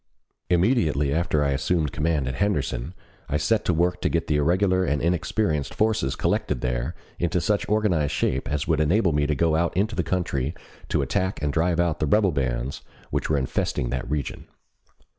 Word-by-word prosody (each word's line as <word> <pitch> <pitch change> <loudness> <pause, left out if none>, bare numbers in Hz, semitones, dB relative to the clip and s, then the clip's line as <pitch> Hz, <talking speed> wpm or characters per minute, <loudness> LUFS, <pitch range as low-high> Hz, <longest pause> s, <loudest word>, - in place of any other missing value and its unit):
Immediately 85 - +2
after 80 -2 +1
I 70 - +1
assumed 75 +3 0
command 75 -3 0
at 65 - -2
Henderson 90 -7 -1 0.3
I 75 - +1
set 110 +6 +1
to - - +2
work 90 +2 +1
to - - +1
get 85 0 0
the 75 - +1
irregular 95 +5 +2
and 75 -5 0
inexperienced 85 -2 0
forces 105 -12 +1
collected - - -1
there 60 -1 -2 0.2
into 85 +1 +1
such 100 +4 0
organized 95 -9 +2
shape 65 - -1
as 75 0 -1
would 80 -2 +2
enable 85 +4 +3
me 75 -1 +1
to 75 - +1
go 80 +2 +2
out 85 +2 0
into 110 +3 +1
the - - +1
country 80 -5 -1 0.3
to - - +1
attack 95 -1 -1
and 70 -1 0
drive 85 +2 +1
out 85 -3 +1
the 75 - 0
rebel 100 +4 +3
bands 65 -2 -2 0.3
which - - -1
were 75 - +2
infesting 65 -2 -1
that 65 0 -3
region. 75 -2 -3
80 Hz, 185 wpm, -24 LUFS, 70-90 Hz, 0.3 s, enable